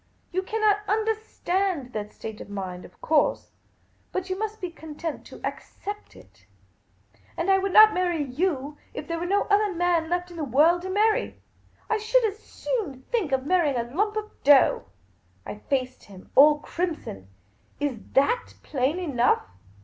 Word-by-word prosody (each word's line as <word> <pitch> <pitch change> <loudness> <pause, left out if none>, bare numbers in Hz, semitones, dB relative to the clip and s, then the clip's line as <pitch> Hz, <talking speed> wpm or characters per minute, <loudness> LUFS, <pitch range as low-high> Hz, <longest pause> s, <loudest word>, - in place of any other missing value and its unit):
You 370 +2 0
cannot 425 +1 +2
understand 395 - -1
that 210 -1 -4
state 220 -1 -8
of - - -10
mind, 185 -3 -5
of - - -17
course; 310 -1 +1 0.6
but 375 0 -3
you - - 0
must 435 +2 -4
be 360 -2 -4
content 320 -1 -7
to - - -12
accept 410 +1 -7
it. - - -19 0.9
And 350 +4 +1
I 385 - +5
would 390 0 -1
not 430 +2 +8
marry 350 -5 0
jjw< 290 0 -2 0.2
if - - -6
there 335 0 -2
were 350 - -3
no 400 +2 +2
other 410 0 +2
man 345 -2 +1
left 355 0 -1
in 345 - -10
the 315 - -2
world 305 +7 +4
to 375 - -5
marry. 425 +3 +1 0.5
I 440 - 0
should 460 +4 +3
as 420 -1 -2
soon 315 - -4
think 430 - 0
of 265 0 0
marrying 325 -4 +2
a 235 - 0
lump 420 +3 +1
of 425 0 -4
dough." 280 -1 +5 0.6
I 210 - -7
faced 255 -2 -1
him 190 -2 -14
all 295 +2 +7
crimson. 310 - -4 0.3
" 105 - -37
Is 285 -6 -2
that 380 - +2
plain 275 +4 0
enough 275 -9 +1
345 Hz, 170 wpm, -26 LUFS, 275-405 Hz, 0.9 s, not